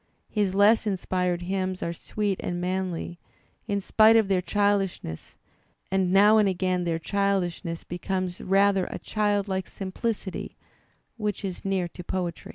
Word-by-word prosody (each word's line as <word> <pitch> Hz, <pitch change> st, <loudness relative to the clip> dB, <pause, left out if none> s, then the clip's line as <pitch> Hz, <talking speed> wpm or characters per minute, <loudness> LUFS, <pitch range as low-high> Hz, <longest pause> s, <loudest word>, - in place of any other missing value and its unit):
His 200 Hz, -3 st, 0 dB
less 215 Hz, +2 st, +5 dB
inspired 180 Hz, -2 st, -1 dB
hymns 185 Hz, 0 st, -2 dB
are 170 Hz, -, -2 dB
sweet 200 Hz, +2 st, -2 dB
and 175 Hz, 0 st, -3 dB
manly, 180 Hz, -1 st, -3 dB, 0.5 s
in 200 Hz, -2 st, 0 dB
spite 220 Hz, +3 st, +5 dB
of 220 Hz, -3 st, +4 dB
their 190 Hz, -2 st, +2 dB
childishness, 195 Hz, -, -1 dB, 0.5 s
and 190 Hz, -1 st, +1 dB
now 205 Hz, +3 st, +6 dB
and 205 Hz, -2 st, +4 dB
again 185 Hz, -1 st, 0 dB
their 165 Hz, -1 st, 0 dB
childishness 180 Hz, -2 st, -1 dB
becomes 185 Hz, 0 st, -3 dB
rather 195 Hz, 0 st, +3 dB
a -, -, -5 dB
childlike 205 Hz, -3 st, -1 dB
simplicity 195 Hz, 0 st, -4 dB, 0.6 s
which 210 Hz, -2 st, -2 dB
is 185 Hz, -2 st, -5 dB
near 190 Hz, -2 st, 0 dB
to 180 Hz, -, -10 dB
poetry. 175 Hz, -1 st, -4 dB
190 Hz, 140 wpm, -26 LUFS, 180-200 Hz, 0.6 s, now